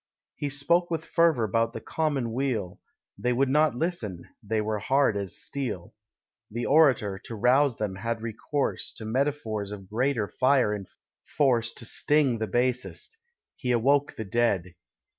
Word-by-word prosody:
He 145 - -3
spoke 170 +5 +2
with 165 -1 -2
fervour 165 -9 +3
'bout 115 +3 +1
the - - -5
common 140 -4 -1
weal; 115 -8 -2 0.4
They 125 0 +1
would 135 +2 +2
not 150 0 +3
listen: 120 - -3
they 110 +1 -1
were 105 0 -1
hard 135 +1 +2
as 100 -3 -2
steel. 125 -11 -4 0.6
The 120 +3 -3
Orator, 130 -10 +4
to 115 - -8
rouse 125 +3 +3
them, 100 -3 -3
had 115 +2 -2
recourse 115 +5 -1
To 110 - -8
metaphors 110 -4 -1
of 100 -2 -8
greater 120 +1 0
fire 130 -3 +2
and 100 -3 -5 0.4
force, 120 -5 +1
To 115 - -7
sting 140 -1 +2
the 110 - -1
basest. 125 - -1 0.4
He 125 - -2
awoke 140 +4 +2
the 110 - -5
dead. 100 -5 0
120 Hz, 155 wpm, -27 LUFS, 110-140 Hz, 0.6 s, Orator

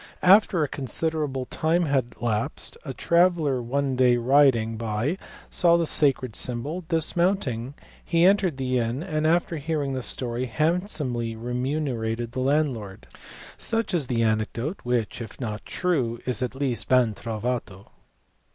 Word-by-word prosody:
After 185 -3 +5
a - - 0
considerable 140 0 -2
time 165 +6 +1
had 130 -5 0
elapsed 110 -2 -2
a 135 - -5
traveller 165 -2 +2
one 135 +2 -1
day 125 -1 +4
riding 120 -3 +3
by 115 - -2 0.3
saw 170 -1 +4
the 170 - +1
sacred 135 -6 +2
symbol; 140 +9 -2
dismounting, 160 - 0 0.3
he 170 0 +3
entered 190 -6 +3
the 130 -1 0
inn, 120 +6 -2
and 155 -3 -1
after 170 0 +1
hearing 145 -2 -2
the 130 - -2
story, 125 0 -3
handsomely 150 - -1
re 120 +2 -5
munerated 125 -4 -2
the 130 - -4
landlord, 130 -8 -1 0.5
Such 225 -2 -1
is 155 -7 0
the 115 -2 +1
anecdote, 115 - -1
which 120 -1 -1
if 115 - -8
not 110 -4 -5
true 130 -11 -1
is 125 0 -2
at 125 +1 -2
least 135 -3 -2
ben 125 -4 +4
trovato. 110 -2 -4
130 Hz, 140 wpm, -25 LUFS, 120-160 Hz, 0.5 s, After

